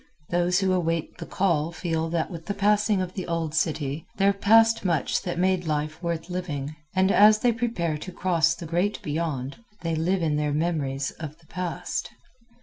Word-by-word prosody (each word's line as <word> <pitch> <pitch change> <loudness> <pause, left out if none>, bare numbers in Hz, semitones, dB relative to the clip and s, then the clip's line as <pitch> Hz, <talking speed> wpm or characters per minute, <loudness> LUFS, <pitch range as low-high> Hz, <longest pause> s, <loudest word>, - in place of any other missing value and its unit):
Those 175 +1 +2
who 190 -1 +2
await 165 -3 -1
The - - -6
Call 170 -5 +1
feel 165 -1 -2
that 170 +2 -1
with 165 -1 -8
the 205 - -2
passing 210 -1 +2
of 180 0 -6
the 185 - -5
old 165 -2 -2
city 150 -2 -1
there 200 0 +4
passed 225 +3 +4
much 170 -6 +1
that 175 -1 -4
made 185 -1 +1
life 155 +1 -2
worth 170 -1 -3
living, 155 -6 -4 0.2
and 190 +1 +3
as 210 +2 +7
they 240 +3 +2
prepare 220 -10 -1
to 185 - -7
cross 170 -3 +2
to 170 - -8
the - - -9
Great 185 +5 +1
Beyond, 145 -4 -3 0.2
they 165 -1 -1
live 170 +3 0
in 150 -2 +1
their 150 -1 0
memories 145 -4 -1
of 155 -1 -7
the 165 - -25
Past. 180 +1 -4
170 Hz, 190 wpm, -26 LUFS, 155-190 Hz, 0.2 s, as